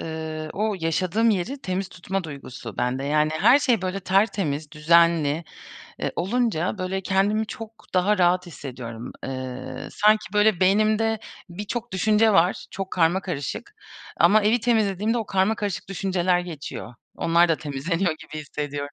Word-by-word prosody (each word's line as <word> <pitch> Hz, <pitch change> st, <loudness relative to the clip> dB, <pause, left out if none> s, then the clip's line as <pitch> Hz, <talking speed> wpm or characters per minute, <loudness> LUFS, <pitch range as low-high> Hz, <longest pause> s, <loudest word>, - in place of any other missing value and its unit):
ııı, 160 Hz, -1 st, -5 dB
o 215 Hz, +1 st, -1 dB
yaşadığım 185 Hz, +7 st, +1 dB
yeri 215 Hz, +8 st, -1 dB
temiz 185 Hz, +1 st, -2 dB
tutma 185 Hz, 0 st, -4 dB
duygusu 135 Hz, -6 st, -8 dB
bende. 125 Hz, +2 st, -1 dB
Yani, 150 Hz, +1 st, +2 dB
her 240 Hz, +7 st, +7 dB
şey 245 Hz, -8 st, +1 dB
böyle 185 Hz, +1 st, -2 dB
tertemiz, 185 Hz, -6 st, 0 dB
düzenli, 165 Hz, 0 st, +3 dB, 0.6 s
ııı, -, -, -1 dB
olunca 195 Hz, -2 st, 0 dB
böyle 185 Hz, +1 st, -2 dB
kendimi 200 Hz, +3 st, +1 dB
çok 225 Hz, +1 st, -9 dB
daha 185 Hz, +2 st, +3 dB
rahat 180 Hz, +1 st, +3 dB
hissediyorum. 125 Hz, -7 st, -8 dB
Eee, 130 Hz, -1 st, -6 dB
sanki 215 Hz, -1 st, +2 dB
böyle 210 Hz, -3 st, +3 dB
beynimde 215 Hz, +3 st, +3 dB, 0.3 s
birçok 210 Hz, +5 st, -5 dB
düşünce 215 Hz, +3 st, +3 dB
var, 180 Hz, -1 st, +2 dB
çok 195 Hz, -1 st, -5 dB
karmakarışık 180 Hz, -, -1 dB, 0.4 s
ama 215 Hz, +1 st, +5 dB
evi 220 Hz, +3 st, +3 dB
temizlediğimde 220 Hz, -1 st, +1 dB
o 220 Hz, -, -3 dB
karmakarışık 200 Hz, +1 st, -1 dB
düşünceler 185 Hz, -2 st, +1 dB
geçiyor. 155 Hz, -8 st, -7 dB, 0.2 s
Onlar 170 Hz, +1 st, +3 dB
da 165 Hz, -, +2 dB
temizleniyor 160 Hz, +5 st, -1 dB
gibi 155 Hz, -, -8 dB
hissediyorum. 145 Hz, 0 st, -5 dB
185 Hz, 135 wpm, -24 LUFS, 155-210 Hz, 0.6 s, her